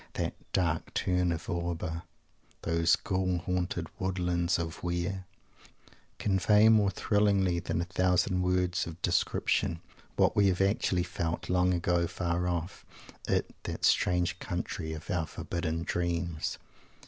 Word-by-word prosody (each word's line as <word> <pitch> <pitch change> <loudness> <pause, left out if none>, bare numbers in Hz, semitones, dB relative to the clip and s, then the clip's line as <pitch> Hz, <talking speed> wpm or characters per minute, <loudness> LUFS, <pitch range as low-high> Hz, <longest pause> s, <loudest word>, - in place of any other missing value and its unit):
That - - -2 0.2
"dark 85 -3 0
tarn 90 -1 +1
of 85 -1 -4
Auber," 85 -1 -2 0.6
those 85 0 +3
"Ghoul 95 -1 -1
haunted 90 +1 -2
woodlands 90 -1 0
of 85 -1 -4
Weir" 90 +2 -2 0.9
convey, 105 +2 +4
more 105 -3 +5
thrillingly 100 -2 +2
than 85 - -2
a - - -2
thousand 90 0 +1
words 90 -1 +1
of 85 0 -8
description, 85 -1 +1 0.4
what - - +3
we 100 -1 +5
have 90 -2 +1
actually 95 -2 +2
felt, 85 -1 -3
long 90 0 +3
ago, 85 -1 +1
far 90 0 -1
off, 85 +1 -3 0.4
in - - +2 0.2
that - - -3
strange 90 0 +2
country 90 -2 -4
of 80 +5 -6
our 85 -3 0
forbidden 85 -1 -3
dreams. 85 -2 -2
90 Hz, 130 wpm, -30 LUFS, 85-95 Hz, 0.9 s, more